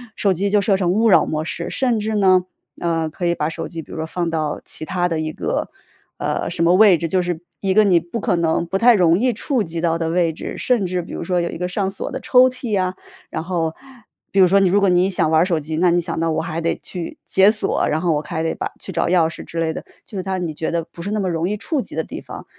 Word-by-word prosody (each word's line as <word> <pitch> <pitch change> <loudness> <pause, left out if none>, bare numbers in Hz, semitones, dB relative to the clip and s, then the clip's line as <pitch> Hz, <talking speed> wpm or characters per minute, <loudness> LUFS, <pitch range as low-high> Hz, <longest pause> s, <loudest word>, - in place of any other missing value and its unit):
手 200 -2 +2
机 195 +3 -1
就 205 +1 +3
设 200 0 +2
成 180 -2 +1
勿 220 +5 +3
扰 205 - +6
模 155 0 -2
式。 - - -4
甚 250 -4 +1
至 215 +1 -2
呢， 185 -3 +4 0.4
呃， 165 -2 0
可 175 +3 -3
以 170 - +1
把 150 -1 -1
手 160 - -5
机 165 -1 -7
比 - - -16
如 - - -6
说 160 - -3
放 170 0 -2
到 155 -2 -2
其 - - -4
他 175 +2 0
的 165 -2 -2
一 155 0 -2
个， - - -3 0.5
呃， - - -2
什 170 - -1
么 170 +1 +4
位 195 -2 +6
置， 165 - -2
就 185 +3 +1
是 175 -2 -3 0.2
一 195 -1 0
个 215 +2 +6
你 185 -4 +4
不 170 +7 -6
可 190 - 0
能 170 0 +1
不 190 - -1
太 235 +4 +6
容 175 -3 +4
易 250 +1 +2
触 240 +2 -1
及 165 -2 -5
到 165 -1 +1
的 165 -1 -2
位 170 -1 +2
置， - - -6
甚 240 -6 +1
至 180 0 -1
比 170 - -11
如 - - -4
说 180 +1 0
有 170 - -2
一 - - -6
个 180 +1 -2
上 190 +2 -1
锁 195 - -4
的 - - -4
抽 255 0 +5
屉 245 -5 -2
啊。 185 0 -1 0.4
然 - - -3
后， 165 -3 -1 0.6
比 195 - +1
如 190 - +8
说 195 +3 +4
你 195 -2 +3
如 200 +3 +3
果 200 -1 +3
你 180 +1 +3
想 180 -4 +1
玩 160 - +5
儿 - - +4
手 175 -4 0
机， 155 +1 -5
那 180 +2 +3
你 175 - +3
想 165 - -4
到 165 0 0
我 160 - 0
还 165 0 -4
得 165 - 0
去 175 -3 -6
解 190 +1 +5
锁， 215 -3 +1
然 155 - 0
后 175 -2 +2
我 150 - -1
还 160 +2 -4
得 160 - 0
把 - - -3
去 - - -5
找 - - 0
钥 170 -2 +3
匙 165 - -8
之 165 - -6
类 160 -1 0
的， - - -6 0.2
就 - - -12
是 - - -1
它 190 0 -2
你 170 -3 -3
觉 160 +1 -3
得 170 0 -1
不 170 - -12
是 190 - -4
那 215 - 0
么 190 -2 -1
容 165 +1 -1
易 210 - -2
触 275 +6 -2
及 195 - -9
的 160 - -1
地 - - -8
方。 - - -10
180 Hz, 315 characters per minute, -20 LUFS, 165-195 Hz, 0.6 s, 如